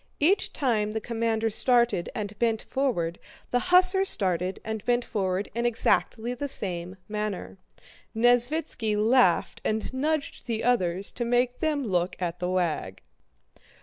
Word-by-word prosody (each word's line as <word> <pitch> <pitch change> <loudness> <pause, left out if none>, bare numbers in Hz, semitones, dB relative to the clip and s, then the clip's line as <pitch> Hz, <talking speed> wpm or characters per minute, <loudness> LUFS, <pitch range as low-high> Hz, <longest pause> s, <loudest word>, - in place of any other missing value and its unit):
Each 355 +8 +2
time 215 -7 0
the 220 - -1
commander 225 0 -1
started 240 -5 +2
and 205 -1 -5
bent 225 -2 +1
forward, 205 -12 -1 0.3
the 245 - +3
hussar 370 +2 +6
started 185 - 0
and 220 -2 -4
bent 245 0 +1
forward 190 -1 -2
in 235 +2 -2
exactly 240 0 +1
the 285 +4 -4
same 180 -7 -3
manner. 210 - -4 0.6
Nesvítski 245 0 +2
laughed 220 -4 +3
and 220 +3 -2
nudged 295 +2 -2
the 225 -2 -2
others 195 -6 +1
to 240 - -3
make 245 +1 +1
them 300 -3 0
look 180 -5 0
at 175 -1 -3
the 180 0 -2
wag. 170 - -2
225 Hz, 140 wpm, -26 LUFS, 185-245 Hz, 0.6 s, hussar